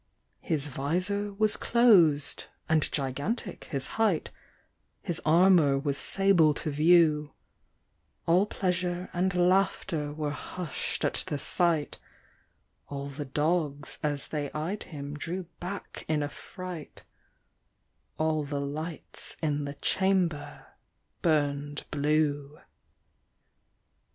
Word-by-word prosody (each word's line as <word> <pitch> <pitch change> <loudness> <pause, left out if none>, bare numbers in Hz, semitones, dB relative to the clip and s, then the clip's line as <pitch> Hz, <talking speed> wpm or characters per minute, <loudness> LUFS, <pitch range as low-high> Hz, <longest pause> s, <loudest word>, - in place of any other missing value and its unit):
His 155 -5 -1
visor 180 +9 -1
was 215 +1 +1
closed, 180 -12 +4 0.2
and 160 -1 +2
gigantic 145 - -2
his 135 -3 -4 0.2
height, 200 -8 +2 0.7
His 170 - -3
armour 165 -4 +5
was 140 0 -1
sable 175 -3 +3
to 155 - -2
view; 155 -1 +4 0.9
All 180 +5 +4
pleasure 180 -2 -2
and 185 +2 +1
laughter 180 -4 +1
were 150 -1 -3
hushed 170 +2 -3
at - - +2
the 145 - -2
sight, 165 0 0 0.9
All 140 0 -5
the 145 +1 -6
dogs 150 0 -1
as 145 -2 -2
they 145 -2 -2
eyed 170 +8 -3
him 145 -3 -6
drew 170 +5 -4 0.2
back 190 +3 -6
in 155 -1 +1
afright, 170 +3 -7 1.1
All 155 -1 +1
the 145 0 -3
lights 155 +4 -4
in 150 -2 -1
the 140 0 -5
chamber 185 -5 0 0.6
burned 145 -2 0
blue. 145 0 0
155 Hz, 105 wpm, -29 LUFS, 145-180 Hz, 1.1 s, armour